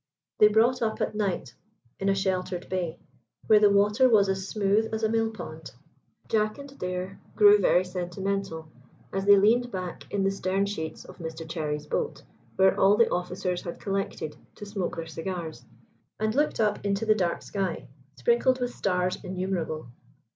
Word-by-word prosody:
They 210 - +8
brought 225 +4 +3
up 220 -1 -1
at - - -1
night 195 - -2 0.5
in 195 - 0
a 195 - +3
sheltered 185 -2 -2
bay, 175 -3 -2 0.5
where 215 -1 +6
the 210 -1 +6
water 210 +6 +4
was 205 -4 +4
as 190 0 -2
smooth 210 +2 +1
as 220 0 -3
a 220 - +3
mill 225 0 +1
pond. 160 -8 -9 0.5
Jack 215 -1 +1
and 280 -1 -10
Adair 180 -5 -5 0.2
grew 205 0 +7
very 185 -1 +3
sentimental 180 -2 -3 0.5
as 195 0 -1
they 200 0 +8
leaned 235 +5 +3
back 185 -3 -6
in 200 -1 0
the 195 - +2
stern 195 0 0
sheets 160 -6 -5
of - - -13
Mr 160 -1 -6
Cherry's 150 -3 -3
boat, - - -3 0.3
where 190 0 +4
all 200 +2 +5
the 230 - +4
officers 180 0 -2
had 170 - -7
collected 195 -6 -3 0.2
to 205 - -9
smoke 200 -3 -3
their 165 - -4
cigars, 165 -5 -6 0.5
and 215 0 0
looked 295 +4 +1
up 210 -2 +1
into 200 +2 0
the 215 - +5
dark 180 -5 -1
sky, 190 -4 -3 0.3
sprinkled 240 - +2
with 245 0 -2
stars 180 -1 -1
innumerable. 180 -5 -3
195 Hz, 170 wpm, -27 LUFS, 180-210 Hz, 0.5 s, They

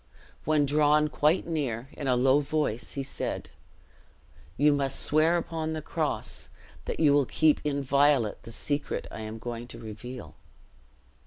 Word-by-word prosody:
When 150 -1 +3
drawn 150 +1 +3
quite 155 +5 +2
near, 135 -7 -3
in 145 - -5
a 125 - +3
low 130 +3 +4
voice 145 -6 -2
he 140 - -3
said, - - -4 1.1
"You 145 +2 +5
must 140 -1 0
swear 160 +3 +3
upon 160 -1 -3
the 155 - -4
cross - - -2 0.4
that - - -4
you 150 -3 +5
will 145 -3 +3
keep 155 -2 +3
inviolate 140 -4 +2
the 115 - -9
secret 145 +5 -2
I - - -7
am 110 0 -6
going 120 +1 -6
to 115 - -10
reveal." 115 +3 -8
140 Hz, 150 wpm, -28 LUFS, 125-150 Hz, 1.1 s, You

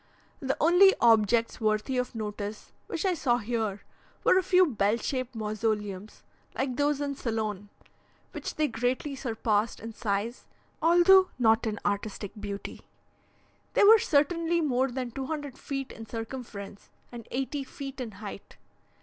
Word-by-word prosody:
The 270 -1 -2
only 355 +5 +6
objects 230 0 +3
worthy 215 +4 0
of 250 -1 -3
notice 210 -1 -5 0.2
which - - -3
I 375 - +3
saw 255 -7 +1
here, 220 -3 -2 0.4
were - - +5
a - - +1
few 370 0 +5
bell 215 - +1
shaped 255 0 -3
mausoleums, 210 -2 -3 0.3
like 260 -2 -1
those 290 +1 +1
in 285 -1 -2
Ceylon, 215 -6 -3 0.6
which - - -6
they 305 0 +1
greatly 250 +4 -2
surpassed 225 -4 -1
in 225 0 -8
size, 215 +2 -3 0.3
although 350 +3 +6
not 225 -1 +3
in 210 -1 -3
artistic 205 0 -2
beauty; 205 -1 -6 0.9
they - - +5
were 440 +2 +9
certainly 335 +2 +2
more 265 -4 +1
than 250 -1 -4
200 275 +1 -5
feet 275 -2 -5
in 225 0 -10
circumference, 225 -3 -7 0.2
and 235 -2 -9
eighty 270 +2 -2
feet 270 0 -8
in 230 -4 -6
height. 200 0 -9
240 Hz, 140 wpm, -28 LUFS, 215-280 Hz, 0.9 s, were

